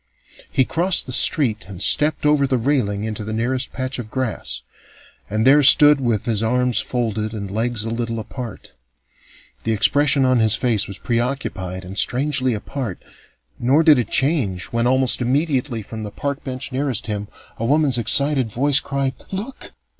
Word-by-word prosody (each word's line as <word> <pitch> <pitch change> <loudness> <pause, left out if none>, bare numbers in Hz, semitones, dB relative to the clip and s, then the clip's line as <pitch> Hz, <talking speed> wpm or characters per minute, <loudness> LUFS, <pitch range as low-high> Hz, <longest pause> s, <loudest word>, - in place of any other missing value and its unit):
He 130 - +2
crossed 175 +5 +1
the 130 - -7
street 120 -3 +2
and 95 -3 -10
stepped 150 +9 +2
over 150 -2 +3
the 130 -1 0
railing 115 -6 -1
into 110 -1 -4
the 110 +1 -5
nearest 125 +3 -1
patch 130 0 -4
of 110 -3 -7
grass, 130 -3 -3 0.7
and 110 +2 -1
there 140 +3 +6
stood 145 +1 +7
with 115 -2 -1
arms 125 +2 +1
folded 110 -3 -3
and 100 -2 -6
legs 115 +1 -1
a 115 - -4
little 115 0 -3
apart. 115 0 -8 0.9
The 115 - 0
expression 140 +5 +2
on 130 -1 +2
his 110 -2 +3
face 115 -5 0
was 100 - -8
preoccupied 115 -7 -3
and 95 +2 -5
strangely 130 -1 +1
apart, 110 -2 -5 0.6
nor 135 +7 +3
did 155 -5 +6
it 120 - -2
change 130 - 0
when, 115 +1 +1
almost 130 0 +1
immediately 130 -2 -1
from 110 +2 -8
the 105 - -5
park 140 +6 -5
bench 130 0 -5
nearest 130 -3 -1
him, 105 -2 -4 0.3
a 115 - -3
woman's 140 -3 +2
excited 140 0 +3
voice 140 +5 +3
cried: 140 -3 -2 0.2
"Look! 215 +8 -7
125 Hz, 165 wpm, -20 LUFS, 110-140 Hz, 0.9 s, stood